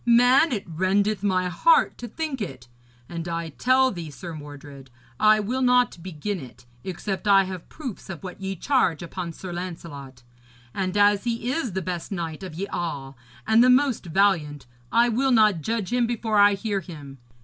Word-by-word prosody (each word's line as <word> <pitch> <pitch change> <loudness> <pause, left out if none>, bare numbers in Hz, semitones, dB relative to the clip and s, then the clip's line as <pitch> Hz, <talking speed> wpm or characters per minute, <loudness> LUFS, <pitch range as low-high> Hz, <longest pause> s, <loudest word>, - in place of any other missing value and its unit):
Man, 245 +6 +5
it 210 -5 -2
rendeth 190 +4 0
my 185 -3 +1
heart 475 - +3
to 240 - -6
think 290 0 -4
it. 130 - -6 0.4
And 170 0 -6
I 165 -1 -3
tell 260 - +3
thee, 170 -6 -6
Sir 170 +3 -8
Mordred, 145 -3 -11 0.3
I 215 0 +5
will 240 +6 -2
not 250 -7 +3
begin 185 +3 -4
it, 125 -3 -12 0.2
except 190 +3 -4
I 195 -1 +6
have 185 -2 -7
proofs 260 -12 -8
of 175 -2 -7
what 185 +1 -8
ye 195 0 -3
charge 185 - +1
upon 170 0 -5
Sir 175 +2 -8
Lancelot. 150 -8 -8 0.5
And 190 +1 -2
as 205 0 +4
he 235 +1 -1
is 260 - -2
the 190 0 -2
best 180 0 -5
knight 165 -4 -4
of 185 -4 -8
ye 190 +4 -3
all, 145 -8 -5 0.3
and 220 +2 +5
the 255 - +5
most 255 -6 +3
valiant, 165 -6 +1 0.3
I 235 +1 +4
will 250 +4 +1
not 215 -8 +4
judge 225 +3 -2
him 245 -1 +2
before 225 -2 0
I 205 0 +6
hear 200 0 -2
him. 145 -6 -11
195 Hz, 180 wpm, -24 LUFS, 170-230 Hz, 0.5 s, I